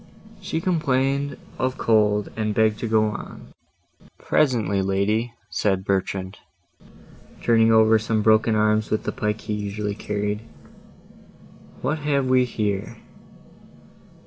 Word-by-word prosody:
She 160 - -3
complained 140 -5 0 0.2
of 130 0 -1
cold, 105 -2 +2
and 110 -1 -2
begged 110 -1 +2
to 115 - -3
go 110 -1 +3
on. 105 - -9 0.6
"Presently, 110 -9 +1
lady," 105 +5 0 0.2
said 95 -2 0
Bertrand, 95 0 -2 1.0
turning 115 -1 +4
over 110 0 +5
some 110 -1 -1
broken 110 +1 +4
arms 110 0 +2
with 110 - -1
the - - -2
pike 105 0 -2
he 110 - -4
usually 105 0 -3
carried. 105 0 -3 1.4
"What 150 +5 -1
have 145 -2 0
we 130 0 +3
here?" 105 -5 -3
110 Hz, 120 wpm, -23 LUFS, 105-120 Hz, 1.4 s, over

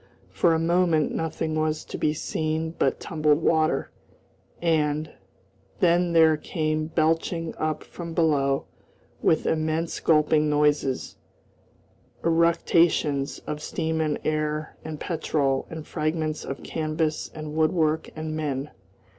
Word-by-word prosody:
For 165 -2 +3
a - - +1
moment 170 -2 +2
nothing 160 0 -2
was 155 0 -1
to - - -8
be 150 - +1
seen 155 +1 -2
but - - +1
tumbled 155 -1 +1
water, 160 -1 +2 0.7
and 155 -2 +1 0.7
then 175 0 +3
there 160 -2 +6
came 155 -1 -2
belching 165 +1 0
up 155 -1 -1
from 170 -2 -8
below, 140 -4 +2 0.6
with 160 - +2
immense 160 +1 0
gulping 155 -1 +3
noises, 145 -3 +1 1.1
eructations 165 -3 +2
of 150 0 -4
steam 160 +1 -2
and 155 -2 0
air 155 0 -1
and 155 -1 -6
petrol 140 -5 -1
and 160 -1 -7
fragments 155 -1 -2
of 135 - -6
canvas 155 0 -2
and 155 -1 -6
woodwork 160 0 +1
and 155 0 -4
men. 145 -2 -3
155 Hz, 120 wpm, -25 LUFS, 150-160 Hz, 1.1 s, there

